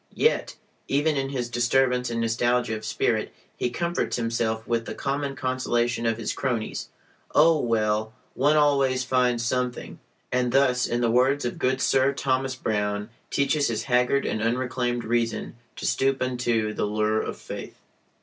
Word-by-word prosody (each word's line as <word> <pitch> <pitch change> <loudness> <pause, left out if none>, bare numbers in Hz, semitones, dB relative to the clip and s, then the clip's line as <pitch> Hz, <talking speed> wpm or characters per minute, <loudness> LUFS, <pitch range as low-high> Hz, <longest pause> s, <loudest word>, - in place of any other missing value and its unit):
Yet, 460 - +1 0.3
even 145 +2 +1
in 135 -1 -1
his 125 -3 -2
disturbance 125 +1 +1
and 115 0 -2
nostalgia 120 +1 +1
of 110 - -7
spirit, - - 0 0.2
he 125 - -1
comforts 170 +7 -1
himself 115 -1 -1
with 115 -1 -1
the - - -5
common 140 0 -2
consolation 120 -3 0
of 115 -1 +1
his 115 - -3
cronies 120 -5 -3 0.5
"Oh, 160 +1 +6
well, 110 -3 0 0.2
one 145 +3 +3
always 140 -3 +3
finds 125 -2 +1
something" 125 0 -2 0.3
and 125 -1 +1
thus 125 -2 +3
(in 120 +1 -1
the 115 -1 +2
words 130 +3 +3
of 120 - -3
good 130 +1 +1
Sir 135 +1 +3
Thomas 130 -1 -1
Browne) 105 -2 -2 0.2
teaches 140 +1 +1
his 115 -1 -2
haggard 125 +2 +2
and 110 - -1
unreclaimed 120 +1 -1
reason 115 -1 -1 0.2
to - - -6
stoop 135 0 +1
unto 120 -4 0
the - - -1
lure 110 +1 +1
of - - -5
Faith. - - -8
125 Hz, 160 wpm, -25 LUFS, 115-135 Hz, 0.5 s, Oh